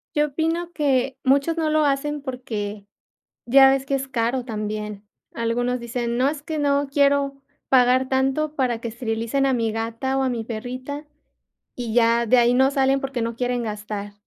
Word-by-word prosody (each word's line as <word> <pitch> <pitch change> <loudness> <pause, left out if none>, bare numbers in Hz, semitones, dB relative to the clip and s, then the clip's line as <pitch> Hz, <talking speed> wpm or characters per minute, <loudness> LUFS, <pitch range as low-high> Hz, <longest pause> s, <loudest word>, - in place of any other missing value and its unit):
Yo 295 0 +3
opino 330 +4 -2
que 270 -4 0
muchos 280 +5 +2
no 315 -1 +1
lo 310 0 +2
hacen 290 +1 0
porque 215 -6 -5 0.6
ya 270 +2 +7
ves 270 0 0
que 275 - -1
es 270 0 -2
caro 245 0 -1
también, 210 -2 -5 0.3
algunos 245 +2 -1
dicen: 235 0 -3
"No, 265 +2 +3
es 290 -1 -4
que 315 0 -4
no 285 -1 +1
quiero 280 0 +2 0.3
pagar 255 0 +4
tanto 270 +3 0
para 245 -4 0
que 235 - -4
esterilicen 230 +3 -1
a 265 - +2
mi 230 -2 0
gata 230 +4 -2
o - - +1
a - - +1
mi 235 -2 -2
perrita", 255 +6 -6 0.7
y 235 -3 -4
ya 235 0 +3
de 250 +3 +4
ahí 240 0 +4
no 265 +2 +4
salen 270 0 +2
porque 270 -3 -3
no 230 0 -2
quieren 245 0 -1
gastar, 210 -1 -5
255 Hz, 180 wpm, -23 LUFS, 230-275 Hz, 0.7 s, ya